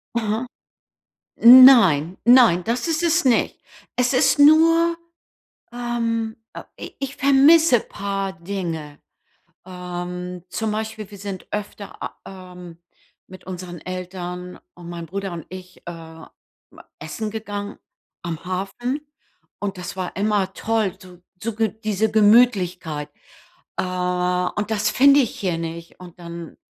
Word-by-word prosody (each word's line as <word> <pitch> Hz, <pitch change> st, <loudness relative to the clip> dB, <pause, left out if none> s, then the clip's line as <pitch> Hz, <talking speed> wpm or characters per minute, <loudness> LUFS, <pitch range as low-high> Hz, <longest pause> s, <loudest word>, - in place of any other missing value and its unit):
Aha. 220 Hz, +1 st, -1 dB, 1.0 s
Nein, 230 Hz, -, +8 dB
nein, 235 Hz, -8 st, +6 dB
das 240 Hz, +7 st, -1 dB
ist 325 Hz, 0 st, 0 dB
es 335 Hz, -1 st, +2 dB
nicht. 250 Hz, -3 st, +1 dB, 0.4 s
Es 250 Hz, +1 st, +1 dB
ist 255 Hz, -, +3 dB
nur, 330 Hz, +3 st, +5 dB, 0.7 s
ähm, 230 Hz, -2 st, -2 dB, 0.2 s
äh, -, -, -8 dB, 0.2 s
i -, -, -9 dB
ich 275 Hz, 0 st, -5 dB
vermisse 280 Hz, +1 st, +5 dB
paar 195 Hz, -2 st, -4 dB
Dinge. 165 Hz, -5 st, -5 dB, 0.7 s
Ähm, 180 Hz, 0 st, -7 dB
zum 220 Hz, -1 st, -2 dB
Beispiel, 215 Hz, -1 st, -5 dB
wir 200 Hz, -, -11 dB
sind 195 Hz, -2 st, -7 dB
öfter, 205 Hz, -1 st, -7 dB
a -, -, -6 dB
ähm, 180 Hz, -3 st, -11 dB, 0.5 s
mit 185 Hz, -, -14 dB
unseren 180 Hz, -2 st, -8 dB
Eltern 180 Hz, 0 st, -7 dB, 0.2 s
und 175 Hz, -1 st, -12 dB
meinem 170 Hz, -1 st, -7 dB
Bruder 195 Hz, +2 st, -5 dB
und 170 Hz, -2 st, -8 dB
ich, 185 Hz, 0 st, -12 dB
ähm, 165 Hz, -1 st, -10 dB, 0.7 s
essen 210 Hz, +8 st, -5 dB
gegangen 205 Hz, -2 st, -6 dB, 0.4 s
am 170 Hz, -1 st, -6 dB
Hafen 200 Hz, +9 st, -3 dB, 0.6 s
und 200 Hz, -2 st, -4 dB
das 180 Hz, +1 st, -7 dB
war 185 Hz, -2 st, -4 dB
immer 200 Hz, -1 st, 0 dB
toll, 220 Hz, -4 st, -1 dB
so 180 Hz, -2 st, -15 dB, 0.2 s
so 230 Hz, 0 st, -3 dB
G 220 Hz, 0 st, +1 dB, 0.2 s
diese 215 Hz, +1 st, 0 dB
Gemütlichkeit. 195 Hz, -8 st, +2 dB, 0.7 s
Äh, -, -, +1 dB
und 180 Hz, +2 st, -1 dB
das 215 Hz, 0 st, 0 dB
finde 280 Hz, +4 st, +5 dB
ich 245 Hz, -, -2 dB
hier 180 Hz, -4 st, -1 dB
nicht. 165 Hz, +1 st, -7 dB
Und 180 Hz, -1 st, -13 dB
dann, 170 Hz, -1 st, -9 dB
195 Hz, 130 wpm, -22 LUFS, 180-230 Hz, 1.0 s, Nein